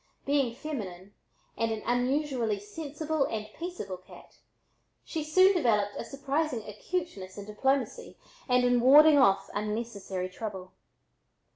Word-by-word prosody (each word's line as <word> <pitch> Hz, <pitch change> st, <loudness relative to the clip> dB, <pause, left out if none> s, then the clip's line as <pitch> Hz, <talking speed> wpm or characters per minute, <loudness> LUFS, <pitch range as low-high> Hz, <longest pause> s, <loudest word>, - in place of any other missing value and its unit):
Being 275 Hz, -4 st, +1 dB
feminine 205 Hz, -, -6 dB, 0.4 s
and 230 Hz, 0 st, 0 dB
an 220 Hz, -1 st, -4 dB
unusually 245 Hz, -2 st, 0 dB
sensible 295 Hz, +7 st, -3 dB
and 215 Hz, -1 st, -3 dB
peaceable 335 Hz, -, -6 dB
cat, 185 Hz, -, -16 dB, 0.7 s
she 320 Hz, -2 st, -3 dB
soon 370 Hz, +6 st, +5 dB
developed 210 Hz, -, +2 dB
a -, -, -4 dB
surprising 275 Hz, -3 st, -2 dB
acuteness 210 Hz, -, -5 dB
in 200 Hz, -, -7 dB
diplomacy 265 Hz, +6 st, -1 dB, 0.3 s
and 250 Hz, 0 st, +4 dB
in 245 Hz, 0 st, +3 dB
warding 290 Hz, +4 st, +8 dB
off 195 Hz, -6 st, +3 dB
unnecessary 205 Hz, -3 st, -3 dB
trouble. 185 Hz, -1 st, -7 dB
245 Hz, 120 wpm, -29 LUFS, 205-295 Hz, 0.7 s, warding